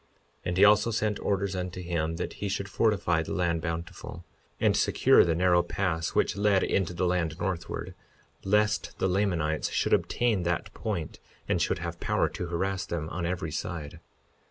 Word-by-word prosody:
52:9 - - -37 0.4
And 90 0 -1
he 100 - +7
also 105 +3 +5
sent 105 -2 0
orders 100 -1 -1
unto 90 0 -4
him 85 -2 -2
that 85 - -4
he 100 - -1
should 100 +1 -2
fortify 95 -6 +1
the 80 - -4
land 85 -2 0
Bountiful, 85 0 -6 0.3
and - - +3
secure - - +5
the 85 - +1
narrow 90 0 +4
pass 85 -2 -2
which - - +2
led 100 -1 +3
into 90 -2 0
the 90 - 0
land 85 -3 0
northward, 90 -3 -3 0.5
lest 105 +2 +1
the - - +1
Lamanites 90 -5 0
should - - 0
obtain 115 -6 +2
that 85 -1 -2
point 90 -8 -4 0.3
and - - +1
should - - +1
have - - -5
power - - +1
to 90 - -5
harass 95 +2 -1
them 80 -2 -3
on 85 0 -3
every 85 -3 -3
side. 80 -1 -5
90 Hz, 180 wpm, -28 LUFS, 85-100 Hz, 0.5 s, he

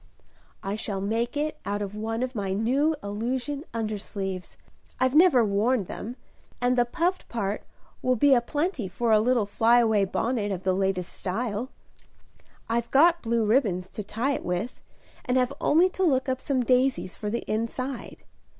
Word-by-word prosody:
"I 195 +1 -2
shall 210 -2 -3
make 230 +6 -1
it 305 +1 -2
out 205 0 -2
of 200 0 -5
one 225 +3 -2
of 255 0 -3
my 200 -4 -2
new 265 +10 +2
illusion 250 +8 -3
undersleeves. 200 -4 -4 0.4
I've 255 0 +2
never 305 -7 +6
worn 210 +3 +2
them; 225 +6 -7 0.4
and 245 0 +2
the 245 -1 +3
puffed 345 +8 -1
part 205 -3 -2 0.4
will 255 0 +2
be 280 +4 +5
a 245 - +5
plenty 290 - -2
for 225 +6 -1
a 215 - +6
little 235 -1 +2
fly 225 +4 +3
away 220 -4 +3
bonnet 220 +1 -1
of 190 -1 -4
the 185 - +2
latest 190 -1 -1
style. 220 +4 -3 1.0
I've 235 +1 -1
got 335 +5 +5
blue 230 -1 +1
ribbons 210 -6 +2
to 210 - -6
tie 230 +8 -1
it - - -4
with, 180 +7 -3 0.4
and 250 +1 +1
have 255 +1 +1
only 335 +5 +5
to 375 - -6
look 270 -7 +2
up 260 0 -1
some 260 -3 0
daisies 255 -6 +2
for 210 - -4
the 235 +3 -2
inside. 235 +4 -3
235 Hz, 170 wpm, -26 LUFS, 205-260 Hz, 1.0 s, never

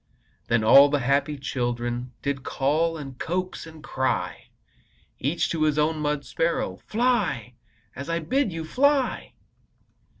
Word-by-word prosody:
Then 115 -1 +2
all 140 +6 +8
the 145 -1 +1
happy 140 +3 +1
children 120 -2 -3
Did 140 -1 -1
call, 155 +6 0
and 135 -4 -8
coax, 180 0 -3
and 160 -1 -13
cry 130 -3 -2 0.7
Each 150 +6 0
to 165 - -2
his 155 -1 +2
own 155 +1 +1
mud 150 -1 -1
sparrow: 165 +1 -1
"Fly, 210 - 0 0.4
as 140 +5 -7
I 165 - +1
bid 230 - 0
you! 165 -1 -5
Fly!" 275 - +1
150 Hz, 135 wpm, -25 LUFS, 135-165 Hz, 0.7 s, all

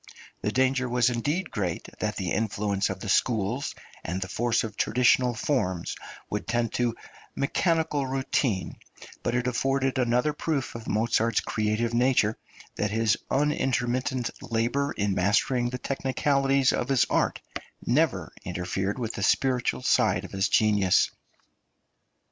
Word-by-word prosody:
The 105 - -1
danger 130 +1 +1
was 125 0 +3
indeed 145 +9 -2
great 90 -5 -3
that 105 0 -1
the 95 -3 -3
influence 100 -2 0
of 95 -1 -5
the - - -5
schools 115 +5 0 0.3
and 90 +3 -3
the 90 - -4
force 115 +4 0
of 110 -2 -5
traditional 125 +1 +3
forms 100 - -1 0.3
would 105 - -4
tend 120 -1 0
to 120 -2 0 0.4
mechanical 150 -1 0
routine, 130 - -1 0.4
but 120 - -1
it 125 0 0
afforded 135 +1 0
another 125 +4 +2
proof 150 -3 -2
of 115 -1 -8
Mozart's 115 +1 +1
creative 110 +2 -1
nature, 120 -3 +3 0.4
that 105 - 0
his 110 0 +2
unintermittent 130 -2 0
labour 120 +5 0
in 100 -1 0
mastering 120 +6 +2
the 125 - -4
technicalities 135 +1 +1
of 120 - -2
his 135 -2 +4
art - - +1 0.5
never 125 - +1
interfered 90 +3 -2
with 115 -3 -3
the - - -5
spiritual 125 +4 +1
side - - +2
of - - -10
his 95 +1 0
genius. 105 -4 +3
120 Hz, 135 wpm, -27 LUFS, 105-130 Hz, 0.5 s, his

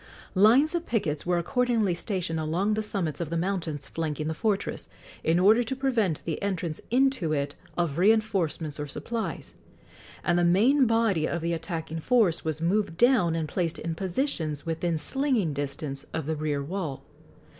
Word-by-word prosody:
Lines 235 - +5
of 340 -1 -2
pickets 165 -10 -1
were 180 -1 +2
accordingly 230 +1 +1
stationed 175 -3 -2
along 170 +7 0
the 215 - 0
summits 175 -8 -2
of 165 - -3
the 170 - -1
mountains 165 -6 -2
flanking 155 -2 -3
the 160 - -1
fortress, 205 +4 -2 0.3
in 165 +1 +3
order 210 +6 +5
to 245 +2 -2
prevent 235 - 0
the 160 - -3
entrance 180 -5 -2
into 255 - +2
it 145 -1 -2 0.2
of 170 -3 0
reinforcements 190 -7 +1
or 150 - -3
supplies, 225 +10 -4 0.7
and 175 -1 +2
the - - +2
main 235 +10 +4
body 225 -8 +2
of 170 - -2
the 170 +1 -1
attacking 165 -1 -4
force 210 -3 +2
was 155 -1 -2
moved 175 -1 0
down 235 -9 +4
and 160 -2 -1
placed 165 +1 -1
in 165 - -3
positions 170 - -2
within 165 0 -1
slinging 240 - 0
distance 140 0 -4
of 160 -3 -2
the 160 +1 -1
rear 150 -2 -1
wall. 160 -3 -4
175 Hz, 165 wpm, -27 LUFS, 160-215 Hz, 0.7 s, Lines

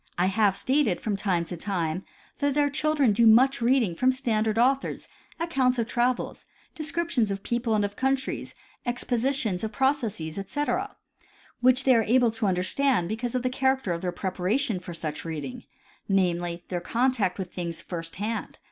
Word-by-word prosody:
I 175 - +3
have 195 0 +2
stated 260 -4 +1
from 210 -2 -2
time 185 -4 0
to 175 - -6
time 175 -1 -2 0.4
that 285 0 +1
our 290 -1 +3
children 300 -5 +2
do 230 +3 +4
much 245 +4 +5
reading 235 -6 +3
from 255 +10 +3
standard 225 -4 0
authors, 265 +3 +1 0.3
accounts 270 -7 +1
of 230 - +1
travels, 240 +2 -1 0.3
descriptions 315 -7 0
of 195 0 -4
peoples 235 -2 0
and 205 -1 +2
of 205 0 -5
countries, 265 +2 -1 0.3
ex 245 0 -2
positions 240 -6 0
of 220 - -2
processes 230 - -1
etc, 295 - -2 0.6
which 255 +2 +4
they 265 - +5
are 230 - +4
able 240 +1 +3
to 220 -2 -1
understand 185 +2 +1
because 235 +3 -3
of 250 - 0
the 255 - +1
character 265 -5 +1
of 170 - -4
their 180 - -1
preparation 195 +6 -1
for 175 -1 -8
such 155 -2 -4
reading, 165 - -6 0.4
namely, 175 -2 0
their 175 -1 -2
contact 230 -3 +1
with 185 -3 -6
things 170 -2 -4
first 165 -2 -6
hand. 215 +4 -4
225 Hz, 170 wpm, -26 LUFS, 185-260 Hz, 0.6 s, much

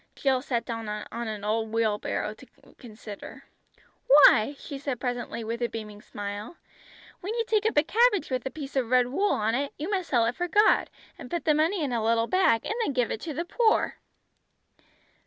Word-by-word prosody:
Jill 265 -2 +1
sat 245 -4 -2
down 225 -2 -5
on 225 +2 -5
an 215 -2 -5
old 220 +1 -1
wheelbarrow 220 -2 -1
to - - -16 0.3
consider. 215 -4 -10 0.6
"Why," 275 -2 +7
she 280 -1 -8
said 270 -3 -3
presently 245 -2 -3
with 230 +2 -4
a 240 - +1
beaming 210 -2 -8
smile, 205 +9 -7 0.6
"when 415 +5 -4
you 460 -1 0
take 430 -1 +1
up 445 - -2
a 295 - +6
cabbage 415 - +2
with 255 -1 -1
a - - -2
piece 280 -1 -8
of 255 -4 0
red 250 -1 +3
wool 395 +10 +1
on 215 +1 0
it, 275 +3 -1
you 315 +7 -4
must 375 -4 -1
sell 235 -4 +3
it 235 +2 -1
for 355 - -2
God, 415 +5 +4 0.3
and - - -9
put 345 -1 -3
the 305 - +4
money 320 +4 +1
in 270 -4 -2
a 230 -2 0
little 230 +1 +2
bag, 235 -7 +2
and - - -1
then 290 - -1
give 250 -3 0
it 220 - -4
to 320 - -5
the 335 - -2
poor." 440 +4 +1
255 Hz, 205 wpm, -27 LUFS, 225-325 Hz, 0.6 s, Why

